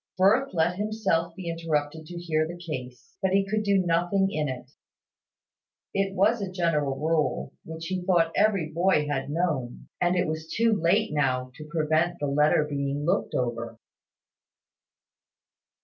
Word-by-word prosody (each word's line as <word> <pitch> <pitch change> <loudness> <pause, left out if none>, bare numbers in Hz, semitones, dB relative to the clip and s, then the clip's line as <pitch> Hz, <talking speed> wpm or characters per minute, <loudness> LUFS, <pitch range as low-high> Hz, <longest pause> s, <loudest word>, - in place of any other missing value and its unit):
Firth 220 +9 +4
let 175 +2 +2
himself 195 -6 0
be 185 -2 -7
interrupted 160 -2 -2
to 175 - -8
hear 155 -2 0
the 175 +1 -7
case: 130 -8 -8
but 190 0 +1
he 195 0 +3
could 215 +2 0
do 200 -2 +2
nothing 175 +3 +2
in 150 -4 -1
it. 130 0 -7 1.2
It 195 0 0
was 210 +4 +3
a 195 - -3
general 160 -7 0
rule, 155 0 0
which 160 0 -7
he 185 +1 -2
thought 175 -3 +2
every 200 -7 +2
boy 170 -2 +2
had 140 -1 -2
known; 150 -6 -2
and 175 0 +3
it 180 0 +2
was 160 +1 -4
too 230 0 +3
late 200 +3 +2
now 130 -3 0
to 155 +3 -11
prevent 160 +2 +1
the 145 - -2
letter 150 +2 +3
being 140 0 -2
looked 180 +4 0
over. 115 -2 -2
165 Hz, 155 wpm, -26 LUFS, 150-190 Hz, 1.2 s, Firth